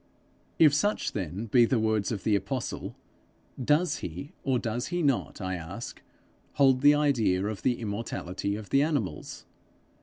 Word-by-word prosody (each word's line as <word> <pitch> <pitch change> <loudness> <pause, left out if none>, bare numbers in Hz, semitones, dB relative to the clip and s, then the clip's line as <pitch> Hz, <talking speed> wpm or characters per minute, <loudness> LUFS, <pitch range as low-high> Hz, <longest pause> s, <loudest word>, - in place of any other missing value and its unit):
If 155 -3 +6
such 205 +9 +1
then 95 +2 -4
be 120 +2 +5
the 125 - +1
words 110 -1 +1
of 100 -4 -4
the 110 - +3
apostle, 125 +4 -3 0.7
does 150 +7 +2
he, 90 - -7
or 130 -2 +1
does 120 +1 -2
he 175 -1 -1
not, 140 -4 0
I 95 -2 -3
ask, 85 -3 -7 0.5
hold 135 -2 +4
the 145 +1 +7
idea 115 -11 +2
of 105 -2 -4
the 125 -2 +1
immortality 100 -3 -3
of 105 -1 -8
the 135 - +4
animals? 140 - -2
115 Hz, 155 wpm, -28 LUFS, 100-140 Hz, 0.7 s, the